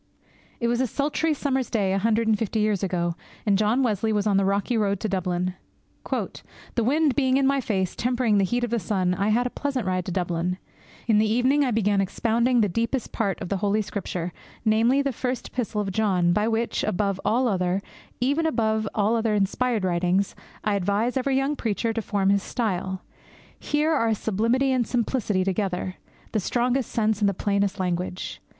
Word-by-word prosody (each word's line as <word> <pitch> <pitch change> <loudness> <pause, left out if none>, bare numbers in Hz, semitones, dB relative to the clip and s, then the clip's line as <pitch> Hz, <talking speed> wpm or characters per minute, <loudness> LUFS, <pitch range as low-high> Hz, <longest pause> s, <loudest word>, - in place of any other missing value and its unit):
It 235 - 0
was 240 +1 +1
a 260 - +1
sultry 295 +6 0
summer's 265 -3 -1
day 195 -4 +1
a 195 - +1
hundred 225 +2 +1
and 220 - +4
fifty 220 +1 -2
years 210 -2 +1
ago, 175 -3 0 0.3
and 205 -2 +3
John 215 +6 +2
Wesley 220 -2 +1
was 210 -1 +1
on 205 -2 +2
the 195 - +2
rocky 200 +5 0
road 200 -3 +1
to 220 - 0
Dublin. 180 -2 -1 0.6
'The 235 - -4
wind 290 +2 +2
being 265 -1 +3
in 275 - +2
my 275 0 +2
face, 190 -7 -1
tempering 240 -4 +1
the - - +3
heat 240 +6 0
of 240 - -2
the 235 - +1
sun, 185 -1 0
I 195 +2 0
had 240 +3 +2
a 250 - -2
pleasant 275 -5 -2
ride 185 -1 -1
to - - -4
Dublin. 175 0 -1 0.5
In 220 -3 +4
the 215 0 +2
evening 260 +5 +3
I 265 - +1
began 210 -3 +2
expounding 235 +5 +1
the 210 - +3
deepest 230 +6 -2
part 200 -5 -1
of - - -5
the 200 - 0
Holy 205 +2 +1
Scripture, 180 -4 -4 0.3
namely, 230 +6 +3
the 280 - 0
First 250 +1 -3
Epistle 225 -4 -2
of 195 -2 -3
John, 185 -4 +2
by 210 +3 +1
which, 230 +1 0
above 195 0 0
all 245 +3 +2
other, 185 -3 +1 0.4
even 285 +6 +1
above 220 -6 0
all 215 +1 +2
other 225 -2 +1
inspired 215 +2 0
writings, 180 +2 +1 0.3
I 210 - +1
advise 205 +5 0
every 265 0 +1
young 275 +2 +1
preacher 225 -2 -1
to 225 - -2
form 200 -2 +1
his 200 0 +3
style. 190 -5 -2 0.6
Here 300 +2 +1
are 230 -7 +2
sublimity 230 +7 +1
and 250 -3 +1
simplicity 225 -5 0
together, 185 -1 -2 0.3
the 220 - +1
strongest 245 +5 0
sense 220 -2 +1
and 205 -2 +3
the 200 - -3
plainest 200 0 0
language! 180 0 -3
215 Hz, 195 wpm, -25 LUFS, 195-245 Hz, 0.6 s, and